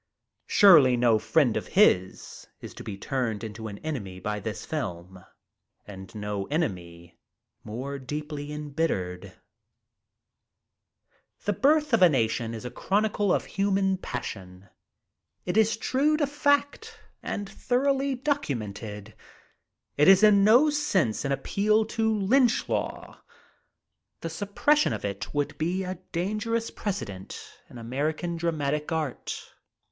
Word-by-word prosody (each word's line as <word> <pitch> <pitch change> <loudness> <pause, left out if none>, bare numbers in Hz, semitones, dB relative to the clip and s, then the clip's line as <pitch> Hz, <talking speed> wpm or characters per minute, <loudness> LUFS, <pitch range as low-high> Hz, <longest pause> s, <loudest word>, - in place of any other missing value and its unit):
Surely 150 -11 +7
no 120 -2 +3
friend 115 +3 +2
of - - -3
his 95 - +2
is - - -9
to - - -10
be 100 -2 -6
turned 115 -2 -2
into 110 0 -6
an 100 -1 -7
enemy 100 -12 -4
by 105 +2 -3
this 105 +1 -6
film, 95 - -5 0.6
and 95 0 -11
no 105 -2 -4
enemy 85 - -4 0.4
more 135 +6 -5
deeply 150 +2 -6
embittered, 120 - -3 2.1
"The 205 - +1
Birth 295 - +2
of 230 - +4
a 180 - +8
Nation" 115 -4 0
is 115 - -8
a 125 - -5
chronicle 205 0 0
of - - +1
human 195 -1 +1
passion. 95 - -7 0.8
It 180 - -2
is 220 0 +3
true 285 +6 +1
to 300 - +2
fact 285 +10 0 0.2
and 205 0 -4
thoroughly 270 +6 0
documented. 110 - -4 0.8
It 150 - +4
is 195 +2 +7
in 205 -2 +6
no 245 +9 +6
sense 190 - 0
an 140 - -1
appeal 210 +10 +1
to 220 0 0
lynch 225 +4 +2
law. - - -4 1.0
The 165 - -4
suppression 205 - +1
of - - -5
it 100 -1 -4
would 145 -1 -2
be 180 +4 -1
a 185 -1 -5
dangerous 215 +6 -2
precedent 105 - -5 0.3
in - - -12
American 150 +9 -2
dramatic 150 -2 -2
art. 155 -5 -3
150 Hz, 125 wpm, -27 LUFS, -, 2.1 s, a